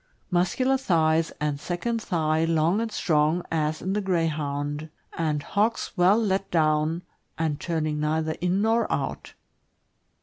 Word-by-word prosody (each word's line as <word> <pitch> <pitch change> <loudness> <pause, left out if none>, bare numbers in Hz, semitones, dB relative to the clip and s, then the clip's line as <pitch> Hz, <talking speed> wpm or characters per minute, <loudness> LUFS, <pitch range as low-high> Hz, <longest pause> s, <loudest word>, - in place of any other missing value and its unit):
— - - -44
Muscular 185 +10 +2
thighs, 165 -8 +2
and 150 -1 -1
second 225 +9 -2
thigh 160 -5 0
long 165 +5 +2
and 230 -1 -3
strong, 160 -1 +1
as 155 -1 -1
in 190 +2 -1
the 210 - 0
Greyhound, 150 -4 -1 0.3
and 150 -3 -1
hocks 215 +7 0
well 185 +3 +5
let 195 -3 0
down, 155 +1 +1 0.3
and 155 -3 -1
turning 155 -3 -1
neither 155 +1 0
in 180 +3 +1
nor 225 +1 +2
out. - - -3
165 Hz, 140 wpm, -26 LUFS, 155-190 Hz, 0.3 s, well